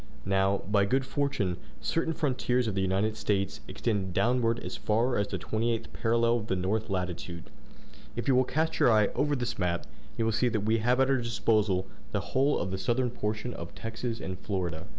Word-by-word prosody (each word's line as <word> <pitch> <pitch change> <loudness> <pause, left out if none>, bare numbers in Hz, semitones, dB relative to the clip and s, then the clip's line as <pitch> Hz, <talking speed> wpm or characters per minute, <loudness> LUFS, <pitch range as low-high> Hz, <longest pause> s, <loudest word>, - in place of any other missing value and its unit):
Now, 95 0 +2
by 100 -1 +3
good 130 +5 +1
fortune, 130 -11 -1 0.2
certain 165 - 0
frontiers 125 -4 +1
of 110 - -1
the 95 - 0
United 95 +3 +1
States 100 -2 -1
extend 100 -5 -2
downward 120 -1 +2
as - - -5
far 115 +4 +1
as 100 0 +1
the - - -3
28th 115 +1 -2
parallel 115 +1 +2
of 110 -2 -5
the 95 - +1
north 105 +5 -1
latitude. 90 -3 -4 0.6
If 120 - -3
you 135 - +5
will 130 +1 +5
cast 160 +5 -1
your - - +6
eye 105 -2 +4
over 145 0 +1
this 120 -4 -3
map, 90 -2 0 0.3
you 115 - +1
will 115 - +2
see 120 +3 +2
that 110 -3 0
we 110 +2 +2
have 125 +3 +2
at 135 0 +4
our 135 - +4
disposal 110 -5 +1 0.3
the - - +2
whole 140 +3 +3
of 95 - -2
the 95 - -2
southern 120 +2 +1
portion 110 +2 -3
of 85 - -8
Texas 115 +1 -4
and 95 -2 -5
Florida." 90 -3 -3
110 Hz, 200 wpm, -29 LUFS, 95-125 Hz, 0.6 s, your